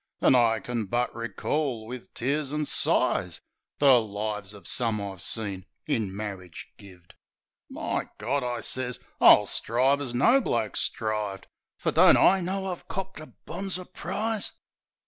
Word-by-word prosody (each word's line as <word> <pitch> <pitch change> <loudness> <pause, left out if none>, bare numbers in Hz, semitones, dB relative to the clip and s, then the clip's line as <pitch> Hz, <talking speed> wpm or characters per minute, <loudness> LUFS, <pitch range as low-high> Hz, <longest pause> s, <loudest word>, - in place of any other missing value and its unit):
An' - - +5
I 115 -3 +4
kin 115 0 -3
but 120 +4 0
recall 115 +2 -2
wiv 120 -4 -8
tears 140 +3 -1
an' 150 0 -1
sighs - - +1 0.4
The 135 -4 +6
lives 105 -1 -4
of 100 -4 -13
some 115 0 +1
I've 100 -3 -6
seen 100 -3 -3 0.2
in 110 -10 -1
marridge 95 -3 -7
gived," 90 -3 -16 0.6
"My - - -3
Gawd!" 140 -1 -1
I 120 -1 -3
sez. 125 0 -2 0.2
"I'll 105 - +8
strive 130 +7 +1
as 125 -4 -4
no 245 - +5
bloke 115 - -1
strivved! 105 -3 -2 0.3
Fer - - 0
don't - - +7
I 190 0 +5
know 190 +2 -2
I've 180 -2 -5
copped 190 -3 -5
a 155 - -9 0.2
bonzer 185 -2 -4
prize?" 215 +3 -3
120 Hz, 145 wpm, -27 LUFS, 105-145 Hz, 0.6 s, I'll